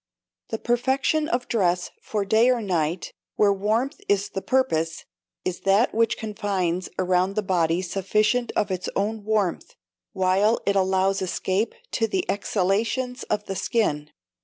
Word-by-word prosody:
The 225 - -2
perfection 265 +6 +1
of 245 +1 -1
dress, 180 -5 +1
for 210 -2 -2
day 220 +5 +4
or 250 -1 +3
night, 175 -4 -1 0.2
where 205 -1 +4
warmth 220 +9 -1
is 200 0 +2
the 195 - -4
purpose, 165 -13 0 0.4
is 185 - -2
that 200 +5 +3
which 230 0 +2
confines 195 -5 -2
around 185 +1 +1
the 215 - 0
body 175 -2 +1
sufficient 215 +6 +1
of 205 -2 +1
its 185 -1 -2
own 215 +1 -1
warmth, 210 -4 -1 0.4
while 190 +4 +2
it 200 - +2
allows 190 +1 +2
escape 190 +3 -1 0.2
to 225 - +1
the 370 +9 -1
exhalations 225 +7 -1
of 210 0 -1
the 195 - -4
skin. 150 -9 0
200 Hz, 145 wpm, -24 LUFS, 185-225 Hz, 0.4 s, day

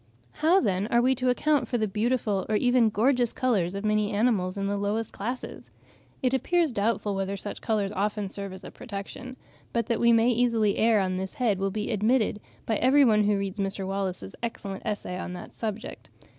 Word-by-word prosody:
How, 330 - +3
then, 195 - 0
are 235 - +3
we 255 +2 +3
to 255 0 0
account 295 +4 +2
for 245 - -1
the 215 -2 0
beautiful 215 -1 0
or 215 - +1
even 245 0 +4
gorgeous 240 +2 +2
colours 195 -8 0
of 200 +2 -4
many 210 0 +1
animals 205 -4 +1
in 195 - -2
the 200 +1 0
lowest 205 +2 -2
classes? 245 +5 -5 0.5
It 255 0 +2
appears 325 +4 +2
doubtful 210 -1 0
whether 195 0 -2
such 205 - -6
colours 210 -3 0
often 205 +1 -1
serve 200 0 -5
as 190 0 -10
a - - -9
protection; 250 +3 -8 0.4
but 235 -2 +1
that 230 -1 -1
we 235 0 +5
may 230 +1 +4
easily 230 -3 +2
err 225 -1 +4
on 185 -1 -1
this 190 0 -4
head, 220 -7 +1
will 195 0 0
be 210 +4 -3
admitted 215 0 +1 0.3
by 220 - 0
every 275 +3 +5
one 215 -3 +4
who 205 0 +2
reads 195 +1 -4
Mr. 195 0 -2
Wallace's 190 - -3
excellent 200 -4 -5
essay 195 -4 -3
on 180 - -5
this 180 - -9
subject. 220 +1 -6
215 Hz, 200 wpm, -27 LUFS, 195-240 Hz, 0.5 s, we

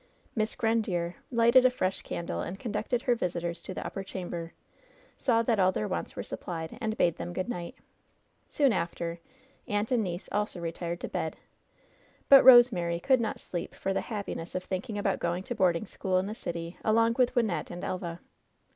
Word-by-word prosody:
Miss 215 -1 0
Grandiere 205 -7 0 0.2
lighted 235 +2 +6
a 255 - +6
fresh 190 -6 -1
candle, 170 - -4
and 185 +3 -5
conducted 230 +1 -2
her 245 - +3
visitors 170 -5 -2
to - - -7
the - - -5
upper 195 - -4
chamber, 175 -3 -6 0.6
saw 230 -3 +2
that 225 -2 +1
all 185 0 +5
their 210 +3 -2
wants 185 - -4
were - - -4
supplied, 165 -2 -5
and 220 -1 -2
bade 170 -2 +2
them 175 +1 -5
good 185 - -2
night. 175 -8 -5 0.7
Soon 275 -5 +3
after, 170 -1 -3 0.5
aunt 205 +2 -1
and 240 -3 +3
niece 175 -1 -4
also 210 -3 -1
retired 170 +1 -4
to - - -3
bed; - - -3 0.9
but 275 -1 +10
Rosemary 230 -10 +7
could 260 +6 +3
not 220 - -2
sleep 175 -2 -5
for 195 - -2
the - - 0
happiness 200 -6 -5
of 185 - -2
thinking 195 +4 -4
about 200 -1 0
going 175 +2 -1
to 240 - -4
boarding 180 -3 +2
school 185 -4 -1
in 185 - +1
tiie 210 +2 -5
city 170 -3 -5
along 230 +1 +3
with 250 -1 +3
Wynnette 220 -7 0
and 175 - -7
Elva. 175 -2 -4
190 Hz, 185 wpm, -29 LUFS, 175-225 Hz, 0.9 s, but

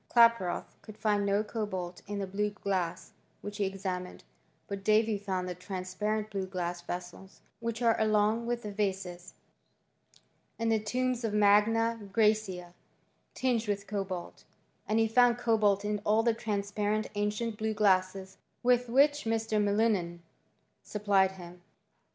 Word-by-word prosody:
Klaproth 230 -6 +3
could 215 -1 -12
find 205 -2 +1
no 200 +1 +2
cobalt 190 -5 -4
in 205 0 -4
the 200 - -2
blue 205 +2 -1
glasi^ 185 -3 -3 0.3
which 205 0 -7
he 205 - +1
examined; 185 -2 -4 0.4
but 200 -1 -5
Davy 215 +1 +3
found 190 -2 -3
the 180 - -3
transparent 190 +4 -3
blue 195 -2 -3
glass 175 -2 -3
vessels, 180 +2 -8 0.2
which 230 +1 -3
are 230 -1 +4
along 215 +2 +2
with 240 0 -2
the 210 - -5
vases, 190 -3 -3 1.2
in 230 0 0
the 220 -1 +3
tombs 250 +3 -1
of 215 -2 -1
Magna 220 +3 +4
Graecia, 210 -5 +1 0.6
tinged 245 -3 0
with 200 -1 -2
cobalt; 195 -4 -5 0.4
and 215 - +1
he 225 0 +4
found 240 +1 +4
cobalt 210 -4 +2
in 210 0 -1
all 215 +2 +3
the 235 -1 +3
transparent 210 0 -1
ancient 210 +2 -2
blue 220 0 -2
glasses 190 -2 +1 0.3
with 245 0 +3
which 290 +3 +4
Mr, 220 -1 0
Millingen 200 -5 +1 0.6
supplied 200 -2 +1
him. 175 -1 -11
210 Hz, 140 wpm, -30 LUFS, 190-225 Hz, 1.2 s, are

